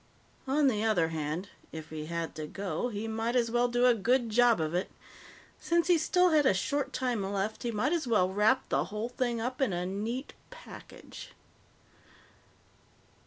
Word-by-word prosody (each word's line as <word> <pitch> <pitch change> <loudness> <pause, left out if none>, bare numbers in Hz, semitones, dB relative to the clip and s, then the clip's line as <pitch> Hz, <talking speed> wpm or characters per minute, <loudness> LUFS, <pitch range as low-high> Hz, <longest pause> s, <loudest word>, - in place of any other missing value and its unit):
On 285 +2 +2
the 215 -5 +1
other 185 -8 +2
hand, 160 +4 -4 0.2
if 160 -1 -9
he 155 -1 -6
had 170 0 -3
to 155 -1 -6
go, 195 +6 -3
he 215 0 -4
might 225 +2 -2
as 235 -2 +2
well 240 +1 +2
do 245 +1 +2
a 250 - +6
good 235 +2 +1
job 240 -1 +4
of 155 0 -2
it. 180 +2 -1 0.7
Since 340 0 +1
he 345 -2 +5
still 360 +3 +3
had 305 -2 +4
a 190 - +4
short 285 +9 -1
time 245 -4 -1
left, 200 +2 -2
he 240 - -2
might 235 +7 0
as 330 -6 -1
well 210 -6 +3
wrap 210 +7 +2
the - - +1
whole 215 +3 -4
thing 240 -1 -2
up 250 +3 -4
in 255 -8 +2
a 175 +1 -2
neat 220 +8 -4 0.2
package. - - -12
225 Hz, 180 wpm, -30 LUFS, 190-250 Hz, 0.7 s, a